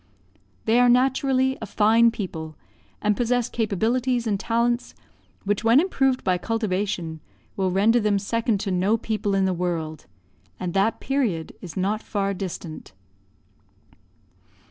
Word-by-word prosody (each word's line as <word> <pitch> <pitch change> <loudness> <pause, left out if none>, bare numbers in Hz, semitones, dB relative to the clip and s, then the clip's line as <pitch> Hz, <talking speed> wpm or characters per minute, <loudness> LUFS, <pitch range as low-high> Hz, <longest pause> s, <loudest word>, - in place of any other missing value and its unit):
They 230 +2 +4
are 245 0 +5
naturally 265 +1 +2
a 220 - -5
fine 225 +4 +4
people, 160 -8 -6 0.5
and 210 0 +2
possess 245 0 0
capabilities 235 +3 0
and 205 -3 0
talents, 235 +2 0 0.5
which 205 +2 -1
when 230 +4 +6
improved 270 -7 +1
by 180 -1 +1
cultivation 190 -7 -2 0.4
will 190 -1 0
render 210 +6 +3
them 210 -2 +2
second 225 +1 0
to 200 - -2
no 190 +5 +2
people 210 -2 -2
in 195 -1 +2
the 190 - +1
world; 165 -3 -3 0.5
and 180 -2 -3
that 200 +3 +1
period 230 - -1
is 175 -2 -9
not 205 +4 0
far 200 -2 -2
distant. 180 - -7
210 Hz, 135 wpm, -24 LUFS, 190-235 Hz, 0.5 s, when